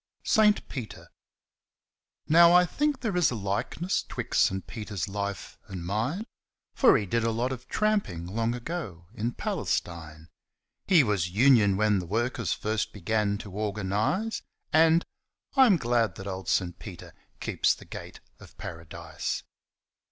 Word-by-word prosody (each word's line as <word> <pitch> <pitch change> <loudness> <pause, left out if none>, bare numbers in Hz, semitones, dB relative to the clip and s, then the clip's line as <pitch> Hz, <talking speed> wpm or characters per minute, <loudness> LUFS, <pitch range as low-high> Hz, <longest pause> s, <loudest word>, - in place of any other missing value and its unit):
SAINT 215 -2 +3
PETER 125 -6 -7 1.2
Now, 170 +2 +7
I 180 0 +7
think 290 - -1
there 220 -7 -1
is 175 -3 +4
a 125 - -3
likeness 105 - -1
'Twixt - - 0
St. 95 0 -2
Peter's 105 -7 -5
life 100 -1 -5
and 90 -3 -7
mine, 115 - -1 0.5
For 265 - +5
he 105 - -2
did 115 +4 0
a 115 - +2
lot 120 +3 -1
of 125 -1 -7
trampin' 205 - 0
Long 115 +6 -1
ago 120 - -6
in 120 +2 -2
Palestine. 80 -2 -3 0.6
He 175 -6 +6
was 100 -7 0
'union' 105 -1 +4
when 105 -1 +3
the 90 - -6
workers 115 +4 -1
First 110 0 -2
began 105 +1 0
to 100 - -9
organise, 105 - -1 0.3
And 165 +1 +5 0.5
I'm 255 -9 +6
glad 120 - +1
that 95 - -8
old 95 -2 -5
St. 90 -2 0
Peter 95 -6 -10 0.3
Keeps - - +1
the - - -14
gate - - -9 0.2
of - - -16
Paradise. 80 -1 -5
110 Hz, 145 wpm, -27 LUFS, 95-155 Hz, 1.2 s, Now